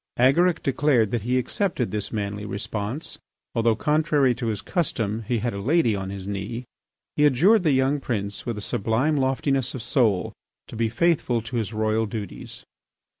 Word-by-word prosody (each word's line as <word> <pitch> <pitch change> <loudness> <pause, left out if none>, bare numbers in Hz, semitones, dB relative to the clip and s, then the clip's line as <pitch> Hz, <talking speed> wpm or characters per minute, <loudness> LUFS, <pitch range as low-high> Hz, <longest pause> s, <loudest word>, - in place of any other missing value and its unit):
Agaric 160 +8 +3
declared 135 -6 +2
that 120 - 0
he 125 +4 0
accepted 130 - -1
this 105 -1 -3
manly 105 -1 -3
response. 105 +6 -4 0.3
Although, 115 -1 +2
contrary 150 -1 +2
to 120 0 -4
his 105 -3 -1
custom, 115 - -1
he 120 - +1
had 120 +2 -2
a 100 - -4
lady 130 -2 +2
on 95 -1 -4
his 95 -1 -6
knee, 100 +5 -4 0.5
he 150 - +2
adjured 170 - +5
the 160 -4 +2
young 135 +2 +2
prince, 105 -6 -3
with 120 -3 -4
a - - -5
sublime 115 +10 0
loftiness 135 -1 0
of 125 - -5
soul, 115 -7 +1 0.4
to - - -9
be 115 0 0
faithful 130 -2 +1
to 120 +2 -6
his 110 -2 -2
royal 110 0 0
duties. 105 -3 -7
120 Hz, 175 wpm, -24 LUFS, 105-135 Hz, 0.5 s, adjured